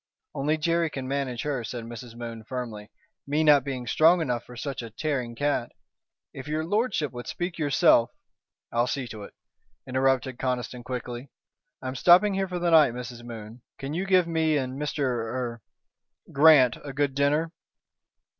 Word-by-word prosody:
"Only 150 Hz, +3 st, 0 dB
Jerry 165 Hz, +1 st, +1 dB
can 135 Hz, -3 st, -6 dB
manage 135 Hz, -3 st, -2 dB
her," 140 Hz, -5 st, -2 dB
said 120 Hz, +1 st, -5 dB
Mrs. 115 Hz, 0 st, -9 dB
Moon, 115 Hz, -1 st, -7 dB
firmly, 115 Hz, -4 st, -6 dB, 0.4 s
"me 150 Hz, +2 st, +1 dB
not 145 Hz, -3 st, +6 dB
being 130 Hz, -3 st, -4 dB
strong 165 Hz, +8 st, +5 dB
enough 125 Hz, -7 st, -1 dB
for 125 Hz, -, -13 dB
such 135 Hz, +1 st, -4 dB
a 115 Hz, -, -7 dB
tearing 125 Hz, -1 st, -3 dB
cat. 145 Hz, -3 st, -1 dB, 0.6 s
If 135 Hz, -, -8 dB
your 155 Hz, +1 st, -1 dB
lordship 205 Hz, -, 0 dB
would 120 Hz, -1 st, -8 dB
speak 175 Hz, -1 st, -4 dB
yourself 145 Hz, -5 st, +4 dB, 0.3 s
" -, -, -66 dB
"I'll 120 Hz, +1 st, +2 dB
see 130 Hz, -1 st, -2 dB
to 110 Hz, -1 st, -8 dB
it," 100 Hz, -, -11 dB, 0.5 s
interrupted 130 Hz, -1 st, 0 dB
Conniston, 125 Hz, -1 st, -3 dB
quickly. 125 Hz, +1 st, -6 dB, 0.5 s
"I'm 130 Hz, 0 st, -3 dB
stopping 180 Hz, +9 st, +5 dB
here 195 Hz, 0 st, 0 dB
for 180 Hz, -1 st, -4 dB
the 175 Hz, -1 st, 0 dB
night, 155 Hz, -7 st, +6 dB
Mrs. 120 Hz, -1 st, -7 dB
Moon. 115 Hz, 0 st, -9 dB, 0.2 s
Can 140 Hz, +1 st, -5 dB
you 185 Hz, +4 st, -2 dB
give 185 Hz, -2 st, +4 dB
me 160 Hz, -2 st, +1 dB
and 130 Hz, +1 st, -3 dB
Mr. 150 Hz, 0 st, -2 dB
er 120 Hz, -1 st, -2 dB, 0.7 s
Grant 140 Hz, -4 st, +6 dB
a 140 Hz, -2 st, -7 dB
good 140 Hz, 0 st, 0 dB
dinner?" 145 Hz, +4 st, +1 dB
135 Hz, 170 wpm, -26 LUFS, 120-155 Hz, 0.7 s, not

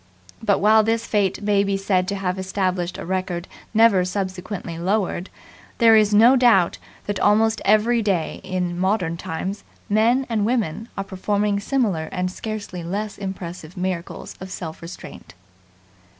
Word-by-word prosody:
But, 210 Hz, -3 st, +2 dB
while 215 Hz, +2 st, +5 dB
this 225 Hz, +1 st, 0 dB
feat 205 Hz, -2 st, 0 dB
may 205 Hz, -1 st, +3 dB
be 200 Hz, -1 st, 0 dB
said 190 Hz, -2 st, +1 dB
to 200 Hz, -, -1 dB
have 190 Hz, -1 st, -2 dB
established 185 Hz, -2 st, -2 dB
a -, -, -6 dB
record 185 Hz, -1 st, -2 dB, 0.2 s
never 220 Hz, -4 st, +5 dB
subsequently 185 Hz, -2 st, -4 dB
lowered, 190 Hz, 0 st, -1 dB, 0.5 s
there 225 Hz, -2 st, +6 dB
is 215 Hz, -1 st, +4 dB
no 230 Hz, +5 st, +7 dB
doubt 235 Hz, -9 st, +4 dB, 0.3 s
that 205 Hz, -1 st, -2 dB
almost 220 Hz, +2 st, +3 dB
every 215 Hz, +3 st, +4 dB
day 190 Hz, -7 st, -1 dB
in 180 Hz, -1 st, -2 dB
modern 185 Hz, -3 st, 0 dB
times 190 Hz, +5 st, -5 dB, 0.3 s
men 230 Hz, +6 st, +3 dB
and 220 Hz, -3 st, 0 dB
women 225 Hz, -2 st, -1 dB
are 195 Hz, -, -1 dB
performing 200 Hz, +2 st, -1 dB
similar 200 Hz, -, 0 dB
and 180 Hz, 0 st, -2 dB
scarcely 200 Hz, -4 st, -6 dB
less 200 Hz, +5 st, -4 dB
impressive 180 Hz, -3 st, -7 dB
miracles 180 Hz, -2 st, -4 dB
of 190 Hz, -, -8 dB
self 165 Hz, -4 st, -7 dB
restraint. 170 Hz, -, -10 dB
195 Hz, 150 wpm, -22 LUFS, 180-215 Hz, 0.5 s, no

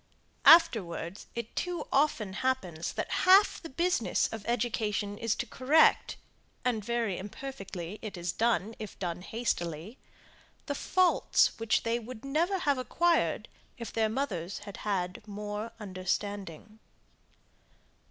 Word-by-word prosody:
Afterwards 205 Hz, -, +5 dB
it 235 Hz, -1 st, -5 dB
too 355 Hz, -1 st, -2 dB
often 270 Hz, -9 st, +1 dB
happens 185 Hz, -11 st, -1 dB
that -, -, -3 dB
half 380 Hz, +3 st, +6 dB
the 330 Hz, -, -8 dB
business 355 Hz, +7 st, +1 dB
of 220 Hz, -2 st, -6 dB
education 215 Hz, -3 st, -1 dB
is 225 Hz, 0 st, -1 dB
to -, -, -3 dB
correct, 290 Hz, +5 st, +3 dB, 0.5 s
and 230 Hz, -4 st, 0 dB
very 230 Hz, -4 st, -1 dB
imperfectly 200 Hz, -4 st, -7 dB
is 180 Hz, -6 st, -4 dB
it -, -, -19 dB
done, 225 Hz, -2 st, +1 dB
if 215 Hz, -2 st, -7 dB
done 175 Hz, -2 st, -4 dB
hastily, 185 Hz, -, -3 dB, 0.7 s
the 285 Hz, -, -2 dB
faults, 365 Hz, +5 st, +3 dB
which 225 Hz, -1 st, +1 dB
they 230 Hz, +1 st, 0 dB
would 240 Hz, +1 st, -9 dB
never 335 Hz, +8 st, +1 dB
have 285 Hz, -7 st, +1 dB
acquired 340 Hz, +6 st, +1 dB, 0.3 s
if 235 Hz, -2 st, -7 dB
their 220 Hz, -1 st, +2 dB
mothers 200 Hz, -8 st, -3 dB
had 200 Hz, -, -8 dB
had 185 Hz, -3 st, -2 dB
more 210 Hz, +2 st, -5 dB
understanding. 200 Hz, 0 st, -4 dB
220 Hz, 125 wpm, -30 LUFS, 195-265 Hz, 0.7 s, half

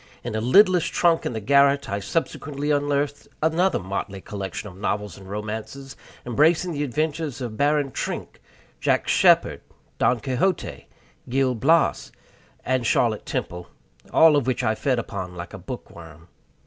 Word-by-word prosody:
In -, -, -4 dB
a 110 Hz, -, -1 dB
lidless 180 Hz, -, +5 dB
trunk 170 Hz, -2 st, +2 dB
in -, -, -4 dB
the 110 Hz, -, -3 dB
garret 140 Hz, +4 st, +3 dB
I 100 Hz, -, -2 dB
subsequently 145 Hz, +3 st, -2 dB
unearthed 145 Hz, 0 st, -1 dB, 0.2 s
another 170 Hz, +4 st, +2 dB
motley 95 Hz, +1 st, -4 dB
collection 95 Hz, -1 st, -6 dB
of 90 Hz, -, -11 dB
novels 100 Hz, -1 st, -3 dB
and 95 Hz, -1 st, -13 dB
romances, 110 Hz, +6 st, -6 dB, 0.3 s
embracing 160 Hz, +8 st, +2 dB
the 145 Hz, -2 st, -2 dB
adventures 150 Hz, +1 st, -2 dB
of 120 Hz, -4 st, -5 dB
Baron 145 Hz, +2 st, +1 dB
Trenck, -, -, -5 dB, 0.4 s
Jack -, -, +1 dB
Sheppard, -, -, +4 dB, 0.4 s
Don 120 Hz, -1 st, +3 dB
Quixote, 130 Hz, -, -2 dB, 0.4 s
Gil 130 Hz, 0 st, +1 dB
Blas, 155 Hz, +8 st, +2 dB, 0.5 s
and 130 Hz, -1 st, +1 dB
Charlotte 115 Hz, -1 st, +1 dB
Temple 90 Hz, 0 st, -4 dB, 0.4 s
all 160 Hz, -2 st, +6 dB
of 140 Hz, -3 st, +1 dB
which 130 Hz, -1 st, 0 dB
I 110 Hz, -2 st, +2 dB
fed 130 Hz, +3 st, 0 dB
upon 95 Hz, -6 st, -5 dB
like 85 Hz, 0 st, -8 dB
a -, -, -8 dB
bookworm. 80 Hz, 0 st, -10 dB
130 Hz, 150 wpm, -24 LUFS, 105-145 Hz, 0.5 s, all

